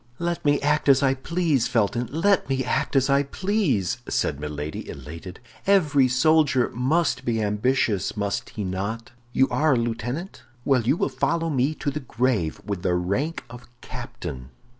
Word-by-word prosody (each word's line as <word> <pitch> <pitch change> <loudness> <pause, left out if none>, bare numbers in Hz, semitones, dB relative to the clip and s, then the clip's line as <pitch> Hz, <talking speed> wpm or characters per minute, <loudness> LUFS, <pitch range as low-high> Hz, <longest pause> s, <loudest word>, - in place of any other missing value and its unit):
"Let 170 0 -2
me 145 -1 +3
act 150 0 +2
as 135 0 +5
I 135 -1 +4
please, 145 -1 0
Felton, 120 0 0
let 180 +5 +2
me 130 -1 0
act 150 +2 -1
as 135 -1 +4
I 140 0 +4
please," 155 - 0
said 70 - 0
Milady, 75 0 -5
elated. 80 +7 -9 0.3
"Every 150 -9 +4
soldier 130 0 +3
must 130 +2 +1
be 115 -3 0
ambitious, 105 -1 0
must 100 -1 -2
he 105 - -5
not? 100 +5 -4 0.2
You 130 +2 +3
are 155 -1 +2
a - - +2
lieutenant? 120 - -3 0.2
Well, 135 -3 +3
you 125 +8 +1
will - - +1
follow 165 -1 -1
me 140 +3 +1
to 145 - -2
the 150 - -4
grave 120 - -1
with 100 -3 -3
the 90 -1 +1
rank 100 - -1
of 120 +1 -12
captain." 90 - -7
130 Hz, 165 wpm, -24 LUFS, 105-150 Hz, 0.3 s, as